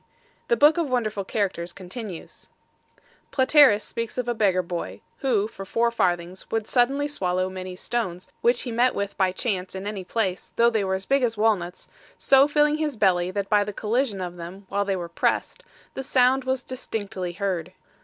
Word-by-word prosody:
The 475 - +2
Book 305 +4 +5
of 320 -5 0
Wonderful 215 -5 -1
Characters 190 -4 -2
continues: 185 0 -9 0.8
Platerus 260 -5 +5
speaks 230 +1 -5
of 250 -1 -2
a 240 - +1
beggar 195 -5 +2
boy, 170 0 -5 0.2
who 225 -7 +1
for 195 -3 -9
four 230 +4 +1
farthings 175 -4 -1
would 225 -1 -1
suddenly 270 +4 +2
swallow 185 -8 -1
many 185 -1 -6
stones 185 -4 -3
which 240 +1 +3
he 245 - -4
met 245 +2 +2
with 200 0 -3
by 190 -1 +2
chance 190 -2 -3
in 190 +1 -5
any 205 -2 -4
place, 190 -1 -2
though 235 0 +4
they 220 -3 +1
were 190 0 0
big 275 0 +3
as 230 -3 0
walnuts, 200 -5 0 0.3
so 270 +1 +5
filling 295 0 +3
his 300 -5 -2
belly 180 -3 +3
that 200 +1 -3
by 205 0 +4
the 205 0 -5
collision 220 -1 -1
of 175 -1 -5
them 180 +4 -9
while 200 +1 0
they 195 -1 0
were 175 -2 -4
pressed, - - -1 0.3
the - - -4
sound 260 0 +3
was 260 0 -1
distinctly 205 -8 -5
heard. 180 -3 -2
210 Hz, 185 wpm, -25 LUFS, 185-250 Hz, 0.8 s, Book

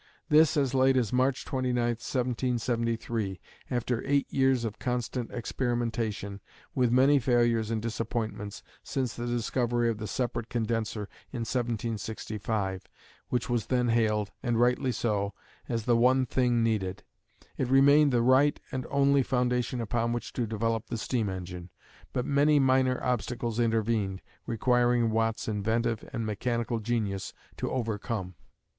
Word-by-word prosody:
This 155 +1 +5
as 135 -3 +1
late 130 0 +4
as 120 -4 0
March 130 +1 +1
29, 130 -2 -1
1773, 120 -3 -1 0.3
after 120 -1 -1
eight 140 0 +2
years 130 -3 +3
of 110 -2 -5
constant 125 -1 -2
experimentation, 115 -4 -2 0.3
with 125 -3 +2
many 135 +3 +5
failures 120 -3 +2
and 115 -1 0
disappointments, 110 -3 -3 0.2
since 130 -4 -2
the 120 0 -4
discovery 120 0 0
of 110 - -6
the 110 - -4
separate 120 +1 -2
condenser 115 -2 -1 0.3
in 120 - -4
1765, 110 -4 -2 0.5
which 125 -1 -1
was 120 -3 -1
then 125 -2 +1
hailed, 110 -3 +1
and 120 -3 0
rightly 125 +2 +2
so, 105 -4 -1 0.3
as 115 -2 -1
the 120 +1 +3
one 130 +2 +4
thing 120 -1 +2
needed. 100 -5 -1 0.6
It 130 - +1
remained 140 +3 +6
the 120 -2 +2
right 130 +4 +4
and 130 0 -3
only 140 0 +4
foundation 125 -1 0
upon 115 +1 0
which 120 - -4
to 120 -3 -1
develop 115 +1 -1
the 115 - -3
steam 110 -1 -1
engine, 90 -1 -6 0.4
but 125 - -1
many 145 +1 +4
minor 130 -1 +3
obstacles 120 -1 -1
intervened, 110 -4 0 0.2
requiring 120 0 +2
Watt's 115 0 0
inventive 110 +2 0
and 115 -4 -3
mechanical 115 +2 -1
genius 105 -4 -2 0.2
to - - -2
overcome. 110 -5 -3
120 Hz, 140 wpm, -29 LUFS, 110-125 Hz, 0.6 s, remained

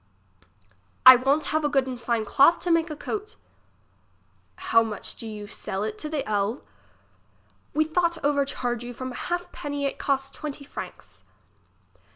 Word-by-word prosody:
I 255 0 +13
won't 275 +5 +1
have 310 0 +1
a 295 - +2
good 270 -2 +2
and 255 -2 -6
fine 235 -2 0
cloth 280 +10 +5
to 355 - 0
make 330 0 +3
a 305 - -5
coat. 425 +7 -5 1.2
How 230 - +3
much 220 -2 -4
do 225 - -8
you 210 -1 -7
sell 195 -1 -4
it 215 0 -4
the 305 -2 -3
ell? 210 +3 -1 1.1
We 310 - +4
thout 340 +1 +1
overcharge 275 -4 0
you 245 0 -7
from 255 +1 -5
a - - -8
halfpenny, 290 -5 -3
it 275 - -3
cost 270 -1 -1
twenty 295 -1 -6
franks. 280 - -9
275 Hz, 155 wpm, -25 LUFS, 235-305 Hz, 1.2 s, I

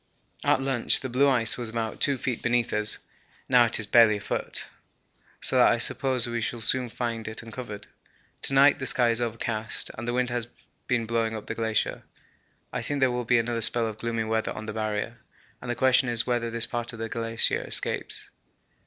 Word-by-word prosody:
At 135 - +2
lunch 135 -3 +2
the 130 - -5
blue 135 +3 +3
ice 120 -3 +1
was 120 -2 -1
about 110 -1 -4
2 140 -1 +2
feet 125 -1 -3
beneath 120 -1 0
us, 105 0 -1 0.5
now 125 -2 +5
it 115 - +1
is 105 - +4
barely 110 0 +5
a - - -8
foot, - - -4 0.7
so - - +3
that - - +6
I - - +1
suppose 130 -3 +2
we 120 -1 -3
shall 120 +1 -3
soon 125 +2 +4
find 115 -2 -4
it 110 +1 -6
uncovered. 115 -3 -8 0.6
To - - 0
night 140 +2 +5
the 130 - 0
sky 120 -2 +4
is 115 +1 0
overcast 115 -1 -2
and 115 +2 -5
wind 125 0 0
has 120 -1 -2 0.4
been 120 -2 0
blowing 115 0 -1
up 110 - -7
the - - -4
glacier. 110 -2 -1 0.7
I - - -2
think 145 -1 -3
there 130 -2 +3
will 125 0 -3
be 120 +1 +3
another 115 0 -1
spell 115 +1 +2
of 110 -1 -6
gloomy 115 -1 -2
weather 110 0 -1
on 110 - -8
the 110 - -5
Barrier, 110 +2 -3 0.4
and 125 - -8
the 120 - -1
question 130 +1 +3
is 120 -1 +2
whether 120 -2 -1
this 115 0 +2
part 120 0 -4
of - - -9
the 115 0 -4
glacier 115 0 0
escapes. - - 0
115 Hz, 205 wpm, -26 LUFS, 110-125 Hz, 0.7 s, that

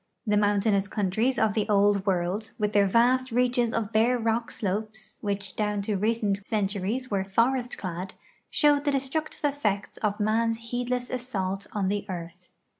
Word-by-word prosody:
The 210 -2 +2
mountainous 205 -1 +2
countries 215 +6 0
of 220 -2 +2
the 215 0 -1
Old 205 -1 +3
World, 190 +4 0
with 210 -2 -1
their 200 -1 +4
vast 250 +5 +3
reaches 245 -1 +2
of 220 -2 -2
bare 235 +3 +4
rock 230 0 0
slopes, 215 +1 -4
which 200 -2 -3
down 210 -1 -1
to 210 0 -1
recent 205 -1 0
centuries 210 +4 -2
were 195 -1 +1
forest 245 +5 +1
clad, 185 0 -5 0.3
show 295 -1 +4
the 290 +1 -1
destructive 280 +3 -2
effects 215 -9 -1
of 210 -1 -1
man's 225 +2 0
heedless 245 0 -1
assault 200 -6 -2
on 200 -3 0
the 205 +1 -2
earth. 175 0 -7
215 Hz, 160 wpm, -27 LUFS, 200-240 Hz, 0.3 s, their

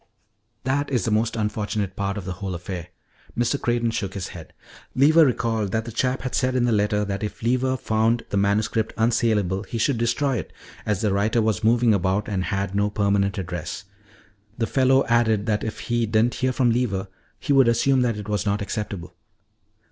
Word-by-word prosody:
"That 140 +3 0
is 125 -8 0
the 115 - 0
most 110 +2 +1
unfortunate 105 -2 -2
part 100 0 -2
of 100 - -6
the 95 - -4
whole 95 0 -4
affair." 90 -1 -6 0.5
Mr. 120 +4 0
Creighton 120 -1 +1
shook 100 -4 -3
his 95 -2 -4
head. 85 -3 -10 0.4
"Lever 155 +5 +6
recalled 115 -5 -1
that 110 0 0
the 115 - -6
chap 125 +3 -1
had 130 - -4
said 130 -1 +1
in 125 -1 +2
the 120 - +2
letter 105 -1 +1
that 100 0 -3
if 105 +1 -5
Lever 130 +2 +1
found 115 0 +1
the - - -1
manuscript 105 +2 0
unsalable 110 -5 +1
he 115 - -6
should 115 +1 +1
destroy 130 +3 +1
it, - - -6 0.4
as 105 -3 0
the 105 -3 +1
writer 105 +4 +1
was 110 -5 0
moving 115 0 +4
about 95 +1 0
and 95 -3 -2
had 100 0 -2
no 105 +1 +1
permanent 100 -2 +1
address. 90 -3 -5 0.7
The 115 - 0
fellow 130 +2 +3
added 110 -3 +2
that 105 -2 0
if 110 - -5
he 120 -1 0
didn't 110 +3 +2
hear 130 0 +2
from 125 -2 +2
Lever 105 -5 -1 0.3
he 145 - 0
would 135 -3 +5
assume 130 +3 +3
that 120 -3 0
it 105 0 -7
was 105 -3 -1
not 100 0 0
acceptable. 100 -3 -5
110 Hz, 195 wpm, -23 LUFS, 100-120 Hz, 0.7 s, Lever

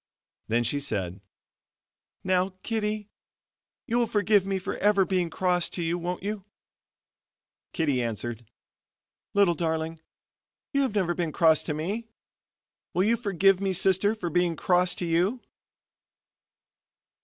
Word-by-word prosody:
Then 120 +2 +1
she 145 +5 0
said: 100 -8 -3 1.0
"Now, 185 0 +1
Kittie, 215 -2 -2 0.7
you 235 +2 +1
will 235 - +2
forgive 205 -2 +2
me 195 -1 0
for 185 - -4
ever 200 -1 +3
being 180 -2 0
cross 180 +1 +1
to 175 - -3
you 165 +1 0
won't 175 +1 -4
you?" 205 -1 -3 1.3
Kittie 145 -7 0
answered, 115 0 -4 0.9
"Little 200 -4 +5
darling, 160 -1 -2 0.7
you 280 - +3
have 260 -6 -1
never 180 -4 +1
been 170 -2 -2
cross 160 -1 +4
to 150 - -2
me. 200 +9 -3 0.9
Will 180 - +3
you 225 +3 +3
forgive 195 -4 +2
me, 195 -1 0
sister, 190 +4 +3
for 175 -6 -4
being 175 0 +1
cross 180 +2 +2
to 175 - -3
you?" 175 +9 +1
180 Hz, 130 wpm, -27 LUFS, 165-200 Hz, 1.3 s, Little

